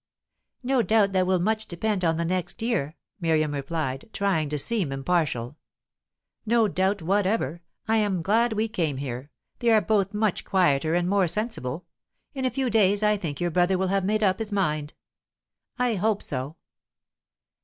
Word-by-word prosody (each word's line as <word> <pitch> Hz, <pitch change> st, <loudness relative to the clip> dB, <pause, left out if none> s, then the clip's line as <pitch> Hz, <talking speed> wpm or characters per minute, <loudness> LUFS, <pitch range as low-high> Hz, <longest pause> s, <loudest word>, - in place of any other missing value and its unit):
"No 260 Hz, 0 st, +2 dB
doubt 210 Hz, -1 st, +3 dB
that 185 Hz, -1 st, +2 dB
will 185 Hz, 0 st, +3 dB
much 220 Hz, +4 st, 0 dB
depend 190 Hz, +2 st, -2 dB
on 165 Hz, -1 st, +2 dB
the 170 Hz, -, -1 dB
next 180 Hz, +3 st, -2 dB
year," 175 Hz, -, -1 dB, 0.2 s
Miriam 155 Hz, -3 st, +1 dB
replied, 140 Hz, +2 st, -3 dB
trying 175 Hz, -7 st, 0 dB
to 150 Hz, -, -2 dB
seem 185 Hz, 0 st, -1 dB
impartial. 135 Hz, -3 st, -1 dB, 0.9 s
"No 230 Hz, 0 st, +3 dB
doubt 190 Hz, 0 st, 0 dB
whatever. 190 Hz, -3 st, 0 dB, 0.3 s
I 225 Hz, 0 st, +3 dB
am 200 Hz, -5 st, 0 dB
glad 225 Hz, +5 st, +2 dB
we 215 Hz, +1 st, 0 dB
came 165 Hz, -10 st, -2 dB
here. 130 Hz, 0 st, -5 dB, 0.3 s
They 235 Hz, -, +2 dB
are 220 Hz, -1 st, +6 dB
both 205 Hz, -2 st, +1 dB
much 210 Hz, -2 st, 0 dB
quieter 160 Hz, -4 st, +2 dB
and 175 Hz, 0 st, +1 dB
more 195 Hz, -1 st, +3 dB
sensible. 180 Hz, -, -3 dB, 0.5 s
In 265 Hz, -2 st, -3 dB
a -, -, +3 dB
few 265 Hz, 0 st, -1 dB
days 205 Hz, -2 st, +3 dB
I 210 Hz, 0 st, +4 dB
think 160 Hz, -8 st, -5 dB
your 175 Hz, -1 st, 0 dB
brother 180 Hz, +3 st, +2 dB
will 190 Hz, 0 st, 0 dB
have 195 Hz, 0 st, +1 dB
made 215 Hz, +3 st, +1 dB
up 190 Hz, -2 st, +2 dB
his 220 Hz, -1 st, -3 dB
mind." 155 Hz, -7 st, -1 dB, 0.8 s
"I 250 Hz, -2 st, +1 dB
hope 210 Hz, +1 st, 0 dB
so." 135 Hz, +3 st, -4 dB
190 Hz, 170 wpm, -25 LUFS, 160-215 Hz, 0.9 s, are